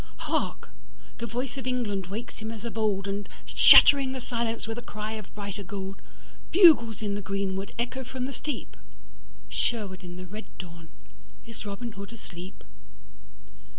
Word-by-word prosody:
Hark, - - -2 0.5
the 235 - -3
voice 250 +4 -3
of 260 - -6
England 210 -7 -1
wakes 215 +5 -6
him 220 0 -5
as 225 0 -8
of 235 - -4
oldAnd, 200 -2 -1 0.2
shattering 275 -2 +8
the 260 - -4
silence 235 -2 -2
with 225 +1 -3
a - - -7
cry 215 -2 -5
of 215 -3 -7
brighter 200 -1 -5
gold, 195 0 -6 0.5
Bugles 285 - +7
in 205 -1 -1
the 205 - -2
greenwood 195 0 -2
echo 245 +3 -2
from 255 0 -4
the 275 - -4
steep, 295 +1 -5 0.7
Sherwood 200 -6 -2
in 175 -1 -8
the 185 0 -7
red 210 +5 -8
dawn, 170 -3 -9 0.6
is 225 -2 -9
Robin 215 +4 -5
Hood 200 +1 -8
asleep? 185 -4 -10
215 Hz, 155 wpm, -28 LUFS, 195-235 Hz, 0.7 s, shattering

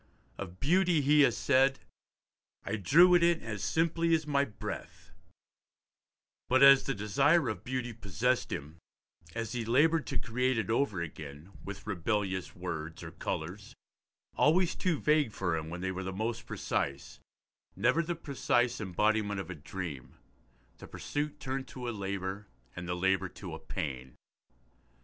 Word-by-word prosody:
Of 95 -2 -7
beauty 175 +2 +3
he 150 +2 +5
has 140 - +4
said, 135 0 +3 0.9
'I 110 - -2
drew 170 - +6
it 175 - +6
in 170 -1 +4
as 105 -3 -5
simply 165 +4 +2
as 160 -1 -2
my 140 -2 +2
breath,' 105 - -8 1.4
but, 130 +2 +5
as 140 -1 +8
the 135 - -1
desire 135 - +3
of 105 -3 -5
beauty 125 -1 -3
possessed 115 +4 -1
him, 80 +4 -6 0.6
as 115 -2 -3
he 120 -1 -2
laboured 150 +7 +3
to - - -2
create 125 +1 0
it 110 -2 -1
over 110 -8 +1
again, 75 +2 -9
with 100 0 -8
rebellious 95 -1 -2
words 80 -3 -5
or - - -7
colours, - - -5 0.6
always 170 +3 +3
too 170 -6 0
vague 150 -7 +2
for 90 -4 -1
him 80 0 -4
when 90 +2 -6
they 95 0 -1
were 95 0 -4
most 115 +4 -3
precise, 70 0 -3 0.6
never 125 - +3
the 170 +1 -3
precise 125 -6 0
embodiment 105 +1 +1
of 95 - -5
a - - -3
dream, 75 -5 -7 0.6
the - - -10
pursuit 145 0 -4
turned 135 0 -4
to 125 -2 -7
a - - -1
labour 100 -1 -4 0.3
and 90 0 -6
the 90 - -1
labour 95 +1 +1
to 90 -2 -9
a 80 - -6
pain. 65 -7 -5
110 Hz, 155 wpm, -31 LUFS, 95-140 Hz, 1.4 s, as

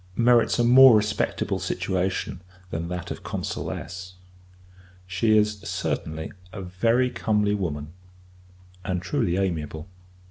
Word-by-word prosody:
merits 120 0 +4
a 120 - +3
more 125 0 +8
respectable 105 0 -1
situation 95 -1 -2 0.3
than 80 +1 -3
that 90 0 -5
of - - -6
Consuless. 90 0 -5 0.9
She 100 +5 +2
is, 105 -1 +1
certainly, 80 -4 -3 0.2
a 100 - -7
very 115 +8 +1
comely 105 -2 +1
woman, 80 -6 -3 0.9
and 90 -1 -1
truly 90 0 -1
amiable. 80 -4 -2
95 Hz, 110 wpm, -25 LUFS, 90-110 Hz, 0.9 s, more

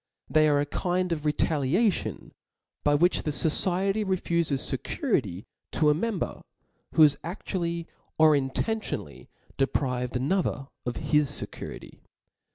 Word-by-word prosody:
They 155 0 +5
are 145 -1 +3
a 145 - +1
kind 180 +4 -1
of 155 -2 -1
retaliation, 160 - 0 0.5
by 145 0 +4
which 175 +5 +3
the - - -3
fociety 185 +7 +1
refufe^ 170 -4 0
fecurity 130 - -1 0.3
to 150 -1 +4
a - - +4
member, 195 +3 -2 0.5
who 160 - +6
has 145 -1 +5
a^ually 170 -1 -3 0.3
or 155 -1 +6
intentionally 135 - -3 0.3
deprived 125 -2 0
another 135 0 0 0.2
of 125 - -2
his 150 -2 +1
fecurity. - - -8
155 Hz, 120 wpm, -27 LUFS, 140-180 Hz, 0.5 s, who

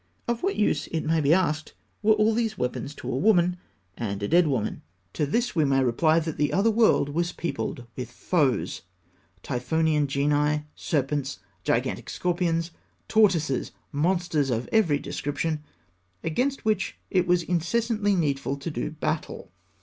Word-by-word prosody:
Of 235 -1 -1
what 390 +1 0
use, 155 -8 +1
it 160 - -3
may 160 0 +2
be 145 0 +3
asked, 155 -3 +1 0.3
were 215 0 +5
all 215 +1 +3
these 220 -2 -1
weapons 125 +3 -3
to - - -5
a - - -1
woman 180 +1 +3 0.4
and 100 -3 -4
a - - 0
dead 175 0 +4
woman? 125 -7 -1 0.3
To 150 - 0
this 235 - 0
we 160 - +3
may 135 -2 +3
reply 155 +6 +3
that 160 -1 -1
the 145 -1 +1
other 210 +4 +3
world 220 -10 +3
was 170 +4 -1
peopled 130 -7 -4
with 125 -2 -5
foes 140 0 0 0.6
Typhonian 150 +4 +1
genii, 150 +2 +1
serpents, 140 - -1 0.3
gigantic 120 +1 -1
scorpions, 170 -2 0 0.4
tortoises, 175 - +2 0.2
monsters 165 -2 +1
of 120 0 -1
every 185 -10 +3
description 145 +2 -3 0.6
against 255 - -1
which 215 -3 0
it 180 -2 +2
was 175 -1 +3
incessantly 205 +5 +1
needful 140 -4 0
to 145 +4 -5
do - - -3
battle. 155 0 -4
160 Hz, 150 wpm, -26 LUFS, 140-185 Hz, 0.6 s, were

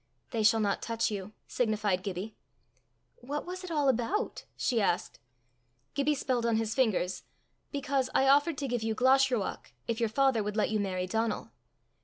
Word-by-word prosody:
"They 225 - 0
shall 220 +1 +5
not 205 -2 0
touch 230 -1 -1
you," 205 0 -5
signified 215 -5 0
Gibbie. 195 +3 -5 0.8
"What 285 +4 -5
was 365 +1 -6
it 365 - -6
all 295 -4 +1
about?" 265 - 0
she 235 -4 +1
asked. 175 -3 0 0.7
Gibbie 290 +1 +1
spelled 255 -3 -1
on 230 -1 +2
his 220 -1 0
fingers, 210 -8 +1 0.5
"Because 275 -2 0
I 270 - +4
offered 285 +3 +4
to 275 - -2
give 245 -2 -1
you 220 0 -1
Glashruach, 260 -3 +2 0.2
if 230 0 -1
your 230 -2 +1
father 265 0 +3
would 210 +1 -3
let 215 - +2
you 215 - +1
marry 185 -2 -1
Donal." 220 +3 -2
230 Hz, 170 wpm, -30 LUFS, 210-270 Hz, 0.8 s, shall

